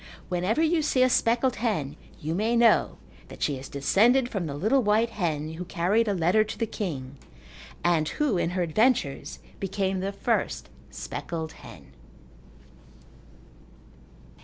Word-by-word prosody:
Whenever 185 - +1
you 325 0 +2
see 265 -4 +2
a 255 - +4
speckled 240 +2 +2
hen 190 - -1 0.2
you 155 +2 -3
may 220 +6 +1
know 235 -1 +4 0.3
that - - -7
she 145 - +1
is 135 - -9
descended 235 - +3
from 190 -8 -3
the 140 - -5
little 220 - +2
white 220 +1 +2
hen 160 -6 -2
who 170 +3 -5
carried 195 +7 +1
a 205 - +1
letter 180 +5 +3
to 215 - -7
the 230 - 0
king, 140 -11 -5 0.7
and 165 -3 +2
who, 295 -8 0
in 175 - 0
her 180 - +2
adventures, 175 - +1 0.2
became 195 -1 -1
the 195 +1 -2
first 200 - -1 0.2
speckled 160 -2 -5
hen. - - -14
195 Hz, 145 wpm, -26 LUFS, 160-230 Hz, 0.7 s, a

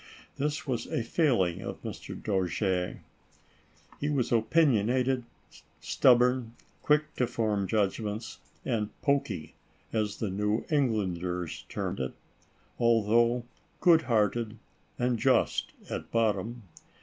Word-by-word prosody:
This 150 +2 -1
was 130 -5 -2
a 120 - -1
failing 110 - +1
of - - -7
Mr. - - -7
Dojere. 95 -2 -1 1.0
He 145 - -1
was 140 -5 0
opinionated, 125 0 +2 0.5
stubborn, 125 -1 +3 0.3
quick 150 +1 +2
to 125 - +2
£orm 105 -4 0
judgments, 105 +2 -1 0.3
and 110 -5 0
"pokey" 135 - 0 0.4
as 105 -2 0
the 105 -4 -2
New 105 +3 0
Englanders 90 - -1
term - - -3
it, 65 0 -2 0.7
although 115 +1 +3 0.4
good 170 -3 +6
hearted 115 -2 0 0.4
and 120 -1 +1
just - - +2 0.2
at - - -5
bottom. 115 +1 0
115 Hz, 105 wpm, -29 LUFS, 105-125 Hz, 1.0 s, good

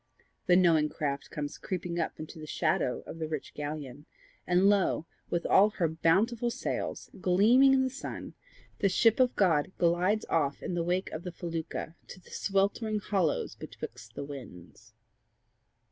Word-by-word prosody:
The 180 - +6
knowing 165 -4 +4
craft 140 -2 -3
comes 145 -2 -5
creeping 175 -2 -3
up 165 - -2
into 155 +1 -8
the 155 - -8
shadow 155 -6 0
of 165 - -8
the 160 - -2
rich 155 -3 -5
galleon, 145 -1 -6 0.4
and 180 +2 +4
lo, 200 -5 +2 0.2
with 170 - -1
all 205 +2 +6
her 185 -5 0
bountiful 200 +10 +2
sails - - -4
gleaming 235 +10 +5
in 265 - +3
the 260 - 0
sun, 270 - -7 0.5
the 200 - +3
ship 225 +5 +4
of 255 -1 +3
God 165 -5 +2
glides 180 +5 +2
off 145 -4 0
in - - -3
the 175 - 0
wake 180 +3 -1
of 160 - -5
the 180 - -6
felucca 165 -2 -5
to - - -10
the 180 - -19
sweltering 200 +2 0
hollows 190 -6 0
betwixt - - -9
the - - -4
winds! 120 - -11
175 Hz, 160 wpm, -30 LUFS, 155-200 Hz, 0.5 s, The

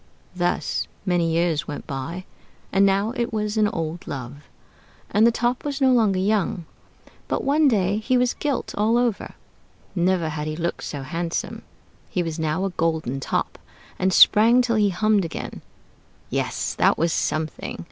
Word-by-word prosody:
Thus 175 0 -1 0.2
many 175 -3 +1
years 165 -2 0
went 145 - -6
by, 160 +6 -5 0.5
and 195 +1 +4
now 200 +4 +1
it 240 -2 -1
was 210 -1 -2
an 215 -1 +3
old 165 -3 -4
love. 140 +2 -7 0.7
And 215 +3 +5
the - - +4
Top 240 +2 -1
was 285 -1 -3
no 265 -2 +4
longer 215 -6 +3
young. 190 -3 0 0.6
But - - -1
one 295 +2 +3
day 200 -5 +2
he 250 +4 +1
was 250 0 +2
gilt 285 -3 -2
all 220 +3 +2
over; 240 -4 -1 0.6
never 175 -2 +1
had 150 -1 -4
he 155 - -3
looked 170 +1 -3
so 140 -2 -5
handsome; 165 +5 -3 0.5
he 180 - -1
was 165 -1 -4
now 160 +4 0
a 195 - -2
golden 160 -6 -1
Top, - - -2 0.4
and 185 0 +2
sprang 230 +6 +6
till 230 -2 +1
he 205 -1 +3
hummed 210 +1 +2
again. 165 - -6 0.7
Yes, - - -1
that - - +3
was 165 0 +1
something! 155 0 -2
185 Hz, 165 wpm, -23 LUFS, 165-220 Hz, 0.7 s, sprang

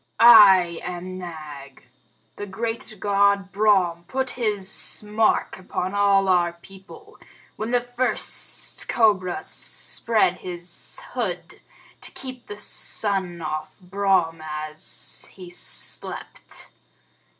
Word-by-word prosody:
"I 190 -7 +8
am 180 +1 -6
Nag. 150 -6 -9 0.5
The 205 - -6
great 225 +2 -4
God 200 -1 +2
Brahm 190 -5 +2
put 265 0 -1
his 210 -4 -1
mark 215 -1 +1
upon 185 0 -4
all 200 -1 +3
our 175 -2 +3
people, 195 - -15 0.4
when 215 +2 -4
the 245 0 +2
first 245 +1 -1
cobra 200 -6 +2
spread 215 -6 +1
his 175 - -6
hood - - -4 0.4
to - - -6
keep 255 -2 -8
the 205 - -7
sun 190 -5 -1
off 155 +2 -5
Brahm 185 -4 0
as 155 0 -4
he 180 -2 -10
slept. 175 - -3
195 Hz, 105 wpm, -23 LUFS, 175-215 Hz, 0.5 s, I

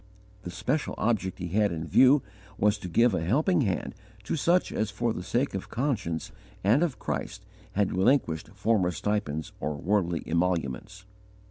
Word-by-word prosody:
The 90 - -7
special 115 - -2
object 105 -5 0
he 90 -1 -5
had 105 +3 +2
in 80 -1 -4
view 130 - +5 0.3
was 105 0 +2
to 90 - -6
give 115 +6 +3
a 85 - 0
helping 155 - +2
hand 95 -8 -1 0.3
to 105 - -2
such 170 +4 +2
as 110 - -1
for 115 +2 -1
the - - -5
sake 120 +9 -1
of 95 - -5
conscience 110 - -2 0.3
and 110 - +4
of 165 -7 0
Christ - - -4 0.3
had 100 -2 +1
relinquished 95 - +2
former 100 -2 +1
stipends 90 -6 -2
or 75 0 -2
worldly 85 +1 0
emoluments. 85 +2 -1
100 Hz, 160 wpm, -28 LUFS, 90-120 Hz, 0.3 s, view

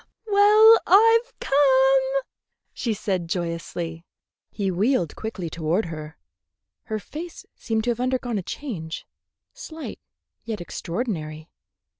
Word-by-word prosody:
"Well, 425 +2 +7
I've 455 +5 +5
come," 270 -1 +3 0.5
she 235 - -2
said 190 -5 -2
joyously. 170 -1 -4 0.5
He 195 -2 -2
wheeled 190 - +1
quickly 215 -6 -5
toward 165 +5 -1
her. 155 -1 -8 0.7
Her 220 - -3
face 315 +11 -8
seemed 220 -1 -2
to 240 - +1
have 235 - -4
undergone 250 -3 -1
a - - -3
change, 175 - -6 0.5
slight 325 -10 -8 0.4
yet 225 -3 -4
extraordinary. 165 -4 -5
220 Hz, 110 wpm, -24 LUFS, 170-275 Hz, 0.7 s, Well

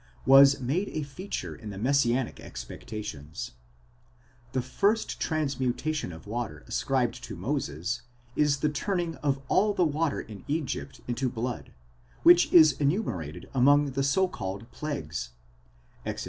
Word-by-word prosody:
was 135 +1 +8
made 155 +11 -1
a 155 - -2
feature 140 - -5
in 105 - -9
the 100 - -7
messianic 125 +1 +1
expectations 75 - -7 1.0
;*°—the 130 0 -1
first 200 - 0
transmutation 140 - -1
of 80 -1 -11
water 115 +2 -4
ascribed - - -1
to - - -6
Moses, 90 - -2 0.3
is 145 -2 +2
the 150 - +3
turning 175 +3 -1
of 140 -2 0
all 205 +6 +3
the 180 - +3
water 155 0 0
in 105 -3 -9
Egypt 150 -2 -3
into 125 +2 0
blood, 120 0 -4 0.5
which 175 +1 +7
is 160 -3 +8
enumerated 140 - -1
among 140 +2 +4
the 135 +1 -1
so 140 +8 +3
called 95 - -5
plagues 75 - -4 0.7
(Exod. - - -4
135 Hz, 135 wpm, -28 LUFS, 110-155 Hz, 1.0 s, was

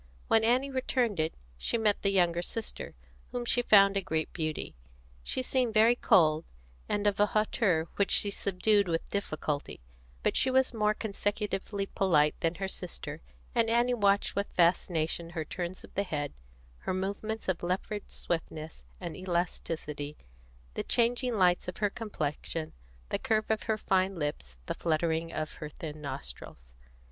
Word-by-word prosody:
When 225 0 +5
Annie 255 +4 +3
returned 250 -6 0
it, 155 0 0 0.2
she 235 - 0
met 215 -2 +2
the 200 - +2
younger 175 -3 +3
sister, 225 +5 -5 0.4
whom 245 -1 -3
she 245 +1 +3
found 200 -4 +6
a 195 - +2
great 160 -3 -2
beauty. 155 - -3 0.5
She 255 - -2
seemed 250 -4 0
very 225 +3 +6
cold, 165 -10 +4 0.5
and 205 0 0
of 205 -1 +2
a 205 - +5
hauteur 205 -6 +1
which 200 - +2
she 200 - +3
subdued 200 +1 +2
with 165 -1 -2
difficulty; 155 -7 -2 0.4
but - - +2
she 260 - +3
was 260 0 +3
more 215 -1 +2
consecutively 205 -1 -2
polite 155 -7 +3
than 165 +1 0
her 195 +1 -2
sister, 165 -5 -5 0.3
and 230 -2 +3
Annie 240 +2 +3
watched 205 -3 +2
with 200 0 0
fascination 170 -1 +2
her 165 -2 -4
turns 175 +3 -5
of - - -14
the 200 - +1
head, 150 -7 -3 0.5
her 185 - -2
movements 200 +4 -3
of 185 -2 0
leopard 190 +4 -2
swiftness 160 -2 -4 0.2
and 170 -4 -5
elasticity, 165 -5 -3 0.6
the - - -2
changing 240 +1 +1
lights 180 -3 +3
of 180 - -5
her 205 -2 +1
complexion, 165 -7 -4 0.4
the - - 0
curves 215 -1 +1
of 215 -3 0
her 220 - +3
fine 190 -1 +1
lips, 145 - -4
the - - -2
fluttering 165 0 0
of 155 -1 -3
her 150 - -6
thin 155 0 -7
nostrils. 60 - -7
190 Hz, 160 wpm, -30 LUFS, 160-215 Hz, 0.6 s, found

